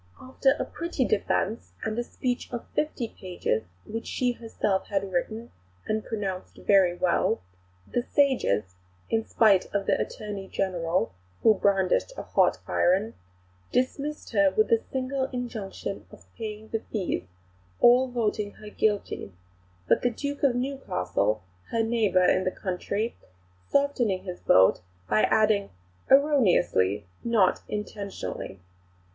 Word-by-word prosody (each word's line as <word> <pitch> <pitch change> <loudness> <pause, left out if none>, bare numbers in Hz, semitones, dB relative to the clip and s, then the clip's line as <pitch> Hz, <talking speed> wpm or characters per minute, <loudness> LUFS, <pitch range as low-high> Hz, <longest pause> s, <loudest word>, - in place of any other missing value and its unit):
After 270 +1 +1
a - - -2
pretty 335 -6 -2
defence, 215 0 -1
and 215 -1 -2
a - - 0
speech 245 0 -3
of 240 -1 -5
fifty 300 -6 -1
pages 175 - -3 0.2
(which 225 +1 -5
she 250 -1 0
herself 220 -4 -2
had 195 -1 -1
written 220 +6 -2 0.3
and 215 0 -1
pronounced 195 -4 -4
very 190 -3 +4
well), 180 -1 +2 0.5
the 245 - -1
sages, 240 - +1 0.4
in 225 0 +1
spite 205 -5 +4
of 200 -1 +1
the - - +2
Attorney 205 -2 -5
General 175 - -1 0.3
(who 220 - +7
brandished 195 - +2
a - - -4
hot - - +3
iron) 195 +6 +2 0.6
dismissed 280 +4 -1
her 295 -1 +4
with 435 +9 +2
the 460 -1 +4
single 265 0 -1
injunction 230 -6 -5
of - - -15
paying 220 -1 -6
the 225 - -1
fees, 180 - -2 0.5
all 250 +2 +6
voting 215 -4 -1
her 210 -1 -11
guilty; 205 - -1 0.6
but - - +4
the 245 - +2
Duke 285 +4 -4
of 270 -4 +3
Newcastle, 110 - -1 0.3
her 230 -1 +1
neighbour 215 -5 +3
in 185 - +3
the 185 - +1
country, 200 +4 -3 0.6
softening 245 -9 +1
his 180 -2 -6
vote 95 0 +5 0.3
by 105 +2 +3
adding 215 -2 +3 0.4
'erroneously, 180 - +4 0.2
not 220 -6 +3
intentionally.' 200 - -5
215 Hz, 130 wpm, -27 LUFS, 185-245 Hz, 0.6 s, who